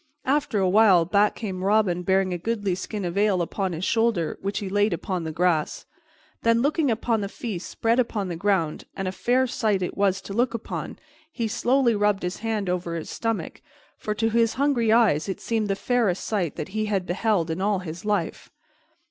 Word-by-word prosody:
After 280 -4 +1
a 190 -2 +2
while 190 -3 +5
back 205 +4 +2
came 190 -5 -5
Robin 195 -3 +2
bearing 190 0 +1
a 175 - -3
goodly 205 -1 -1
skin 200 +2 -4
of 175 +3 -2
ale 205 -3 +3
upon 185 +2 -2
his 170 +2 -3
shoulder, 225 -8 +1
which 200 +1 -2
he 200 - -3
laid 205 +1 +2
upon 180 0 -3
the 160 - -3
grass. 165 -1 0 0.6
Then, 230 +1 +3
looking 300 0 +2
upon 225 -1 0
the 200 - -3
feast 200 -5 -5
spread 230 +2 +1
upon 220 -5 0
the 175 - -4
ground 170 -3 0
and 195 - -2
a - - -1
fair 250 +6 +1
sight 215 -6 0
it 180 - -4
was 195 -1 +2
to 195 - -8
look 240 +2 +1
upon 230 - -5 0.3
he 235 -7 -2
slowly 245 +3 +2
rubbed 205 -1 +1
his 180 +1 -3
hand 220 -3 -2
over 180 -1 -2
his 165 - -5
stomach, 225 -1 -3 0.3
for 210 - -4
to 225 +1 0
his 230 0 +2
hungry 260 -5 +2
eyes 210 -8 +3
it 190 - -3
seemed 225 -2 -1
the 195 - 0
fairest 225 -5 0
sight 185 -9 -1
that - - -5
he 215 +2 -2
had 195 -3 -1
beheld 180 -2 0
in 165 +3 -3
all 205 0 +2
his 170 -2 -7
life. 205 -5 -2
205 Hz, 205 wpm, -25 LUFS, 180-225 Hz, 0.6 s, while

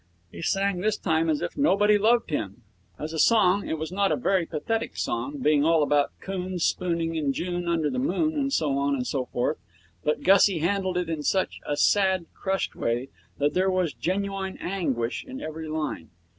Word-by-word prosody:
He - - -9
sang 195 +2 0
this 215 +1 +1
time 160 -2 +1
as 150 -2 0
if - - -4
nobody 210 -8 +4
loved 230 -1 +2
him. 100 -9 -3 0.3
As 155 +2 -5
a 160 - -3
song, 200 -1 +4
it 160 - -1
was 160 +2 -5
not 200 +1 +1
a - - +3
very 190 -8 +1
pathetic 225 +9 -3
song, 290 +1 -2
being 150 - +3
all 160 -1 +4
about 145 0 +2
coons 185 -2 -3
spooning 170 -2 0
in 150 -4 0
June 175 +2 -3
under 165 -3 +1
the 255 - -2
moon, 310 +3 0
and 280 -2 -1
so 150 - +1
on 140 0 +1
and 125 -2 -2
so 130 -2 -2
forth, 125 +5 -1 0.4
but 150 - 0
Gussie 195 -1 +5
handled 185 +2 0
it 180 -1 -1
in 160 -2 -3
such 190 +5 0
a 145 - -1
sad, 190 -2 +3
crushed 190 0 -2
way 120 +3 -1 0.3
that 145 +1 +1
there 190 +1 +2
was 185 -5 0
genuine 195 +2 -2
anguish 135 -11 -2
in 265 0 -8
every 160 - -6
line. 155 - -4
175 Hz, 195 wpm, -26 LUFS, 155-195 Hz, 0.4 s, Gussie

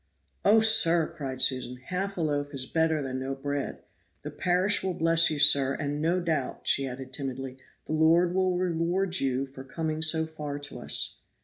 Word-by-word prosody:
"Oh, 220 +2 +5
sir!" 175 -7 +4
cried 130 -3 -2
Susan, 130 -1 0
"half 195 +2 -3
a - - -2
loaf 145 -2 -2
is 130 -1 -3
better 160 0 0
than 130 -1 -4
no 135 +1 -4
bread! 140 +1 -5 0.4
The 150 - -6
parish 180 +6 +1
will 190 -2 -3
bless 165 -1 +4
you, 155 - -2
sir, 140 -2 +5
and 145 0 -3
no 170 +3 +1
doubt," 160 -7 -3
added 135 -1 -5
she - - -4
timidly, 135 -1 -6 0.3
"the - - -4
Lord 165 +3 +3
will 185 -1 +1
reward 180 +1 0
you 135 0 -1
for 135 0 -11
coming 155 +3 -4
so 160 0 +2
far 150 -2 -6
to 145 0 -7
us." - - -1
155 Hz, 185 wpm, -27 LUFS, 135-170 Hz, 0.4 s, Oh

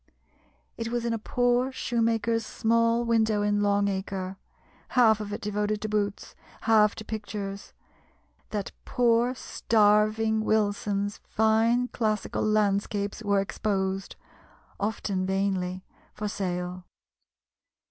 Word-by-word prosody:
It 230 - -3
was 240 0 -2
in 235 - 0
a 225 - -2
poor 245 +3 +1
shoemaker's 230 -2 0
small 230 +2 +1
window 220 -2 +2
in 205 0 +1
Long 205 0 +2
Acre, 190 -1 -3 0.5
half 225 -4 +4
of 210 -1 -5
it 205 - -4
devoted 210 0 -1
to 215 - -3
boots, 205 -1 -2 0.3
half 215 -2 +4
to 220 - -8
pictures 205 -2 -6 0.8
that 205 -2 -3
poor 240 0 +2
starving 215 -1 +2
Wilson's 205 -1 0
fine 225 +3 +3
classical 215 -3 -1
landscapes 205 -1 0
were 200 -2 +2
exposed, 195 -1 -2 0.6
often 200 -2 -1
vainly, 190 -1 -1 0.3
for 210 - -3
sale. 180 -2 -3
210 Hz, 110 wpm, -27 LUFS, 200-225 Hz, 0.8 s, half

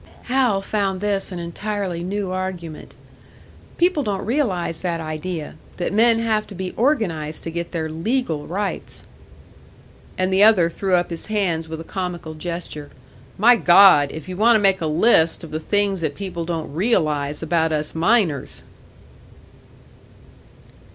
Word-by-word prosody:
Hal 245 -6 +1
found 195 -2 -1
this 200 -1 -1
an 180 - -5
entirely 180 +1 -4
new 195 +1 -3
argument. 185 -4 -5 0.8
"People 345 -3 +2
don't 205 -6 -3
realise 200 - -1
that 170 -2 -2
idea 155 0 -5 0.2
that 180 - -2
men 230 +2 +4
have 220 -2 0
to 200 - -10
be 185 0 -5
organised 175 - 0
to 165 - -5
get 170 +1 -4
their 160 -3 -2
legal 165 - -2
rights." 195 +4 -4 1.1
And 185 +1 0
the 190 - +3
other 200 -6 +5
threw 190 +1 0
up 175 0 0
his 165 - -5
hands 180 -7 -1
with 160 0 -6
a - - -6
comical 175 -3 -5
gesture. 155 -2 -6 0.5
"My 240 +5 +6
God! 175 -7 +6
If 160 +1 -8
you 185 - -5
want 230 +4 +4
to - - +4
make 195 -2 +2
a 160 - 0
list 165 +1 +3
of 165 - -9
the 155 - -3
things 200 +1 0
that 150 -3 -2
people 185 -4 -5
don't 165 -4 -4
realise 155 -7 0
about 160 0 +1
us 150 -1 -2
miners!" 165 - +1
180 Hz, 150 wpm, -21 LUFS, 160-205 Hz, 1.1 s, My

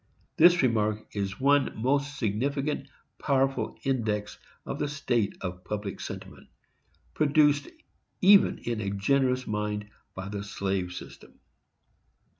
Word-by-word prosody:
This 175 -1 +6
remark 110 -3 0
is 100 -1 -3
one 140 -3 +2
most 140 +4 0
significant, 135 +6 -1 0.3
powerful 135 -1 0
index 110 -6 -1 0.3
of - - -5
the - - 0
state 120 -8 -1
of 90 -1 -5
public 105 -1 -4
sentiment, - - -8 0.7
produced 145 -1 +3 0.5
even 195 +1 +6
in 115 -2 -3
a 100 - -2
generous 125 +6 +1
mind, 105 0 -3 0.2
by 95 +1 -5
the 100 0 -4
slave 95 -3 -2
system. - - -11
115 Hz, 115 wpm, -28 LUFS, 105-140 Hz, 0.7 s, This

